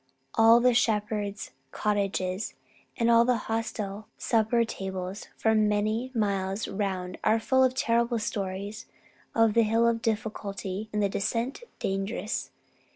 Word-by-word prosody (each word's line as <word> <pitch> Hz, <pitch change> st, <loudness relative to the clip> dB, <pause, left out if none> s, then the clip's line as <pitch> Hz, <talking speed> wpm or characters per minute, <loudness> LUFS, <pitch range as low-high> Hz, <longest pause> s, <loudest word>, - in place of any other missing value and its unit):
All 225 Hz, +1 st, +7 dB
the 250 Hz, +1 st, +4 dB
shepherds' 210 Hz, -3 st, 0 dB, 0.2 s
cottages 195 Hz, 0 st, -1 dB, 0.4 s
and 230 Hz, -, +2 dB
all 230 Hz, 0 st, +7 dB
the 250 Hz, 0 st, +2 dB
hostel 220 Hz, -2 st, -3 dB
supper 230 Hz, +1 st, +2 dB
tables 190 Hz, -2 st, -5 dB
for 220 Hz, -, +2 dB
many 215 Hz, +3 st, +1 dB
miles 200 Hz, -1 st, 0 dB
round 190 Hz, -3 st, -3 dB
are 220 Hz, +1 st, +3 dB
full 260 Hz, +3 st, +3 dB
of 255 Hz, 0 st, +2 dB
terrible 235 Hz, -2 st, +1 dB
stories 200 Hz, -1 st, -4 dB, 0.5 s
of 225 Hz, -2 st, +4 dB
the 230 Hz, -, +5 dB
Hill 230 Hz, +1 st, +3 dB
Difficulty 210 Hz, -3 st, -3 dB
and 210 Hz, 0 st, 0 dB
the -, -, +4 dB
Descent 230 Hz, -, -2 dB, 0.2 s
Dangerous. 195 Hz, +3 st, -2 dB
215 Hz, 125 wpm, -28 LUFS, 200-230 Hz, 0.5 s, All